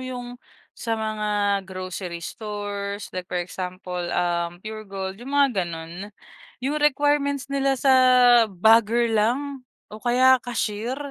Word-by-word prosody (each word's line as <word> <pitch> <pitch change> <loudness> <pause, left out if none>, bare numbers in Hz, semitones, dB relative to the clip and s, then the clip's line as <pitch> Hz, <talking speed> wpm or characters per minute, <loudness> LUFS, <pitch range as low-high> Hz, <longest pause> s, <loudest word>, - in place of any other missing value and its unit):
'yong, 245 -1 -7 0.3
sa 230 -1 -3
mga 210 -2 0
grocery 185 -1 -6
stores, 205 -1 -5
like 185 -1 -6
for 180 - -3
example, 180 0 -5
um, 175 +1 -1
Puregold, 195 -2 -6
'yong 250 - -9
mga 285 0 +4
gano'n? 170 +2 -6 0.6
'Yong 295 +3 -1
requirements 285 -1 +1
nila 275 -1 +1
sa, 265 +1 +3 0.6
bagger 225 +4 +3
lang 260 +6 0 0.3
o 215 - -9
kaya 255 +2 +4
cashier, 235 0 -3
215 Hz, 120 wpm, -24 LUFS, 190-255 Hz, 0.6 s, mga